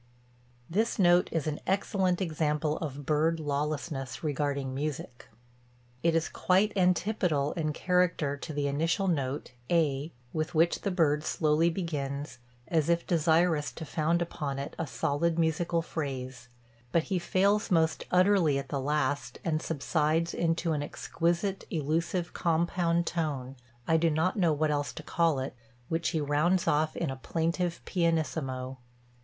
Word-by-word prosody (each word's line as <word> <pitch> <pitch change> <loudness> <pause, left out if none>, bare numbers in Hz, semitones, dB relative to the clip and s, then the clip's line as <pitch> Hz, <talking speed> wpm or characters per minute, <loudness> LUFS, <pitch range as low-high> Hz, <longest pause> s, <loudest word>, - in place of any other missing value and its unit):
This 220 +7 0
note 175 -2 +4
is 160 -4 -1
an 155 -1 -2
excellent 190 -1 +1
example 155 -2 0
of 145 -3 -5
bird 160 +2 +2
lawlessness 145 -2 -3
regarding 140 -2 -1
music. 135 -3 -5 0.7
It 165 0 +2
is 165 0 +2
quite 200 +3 +2
antipodal 180 -5 +1
in 155 -3 -1
character 180 -4 +1
to 150 +3 -7
the 145 -1 -1
initial 165 +7 0
note 140 -7 -1 0.2
(A) 155 -3 +1 0.2
with 155 +1 -2
which 165 +2 +3
the 200 - -1
bird 155 -5 +2
slowly 155 +1 +2
begins, 145 -6 -4 0.3
as 160 -2 +1
if 170 0 +2
desirous 165 -2 +2
to 160 - -7
found 165 +3 +1
upon 145 -5 -4
it 140 +1 -5
a 165 - -2
solid 160 +5 0
musical 165 +1 +1
phrase; 130 -6 -5 0.4
but 170 - +3
he 185 - +2
fails 200 +5 +2
most 165 -4 +2
utterly 180 -5 +4
at 135 -1 -5
the 140 0 -2
last 145 0 -1
and 155 -2 0
subsides 160 +2 0
into 165 0 0
an 150 - -1
exquisite, 170 +6 -1
elusive, 165 +3 -1
compound 170 0 +1
tone 140 -7 -2 0.3
I 160 - +4
do 165 +1 +3
not 160 +4 +1
know 175 -6 +3
what 155 0 +1
else 145 -1 -1
to - - -8
call 165 -3 +1
it 130 0 -4 0.3
which 165 0 0
he 160 - -1
rounds 155 +5 +1
off 155 +1 +1
in 160 -5 -1
a - - -4
plaintive 170 +5 -1
pianissimo. 150 -7 -1
160 Hz, 150 wpm, -29 LUFS, 145-170 Hz, 0.7 s, note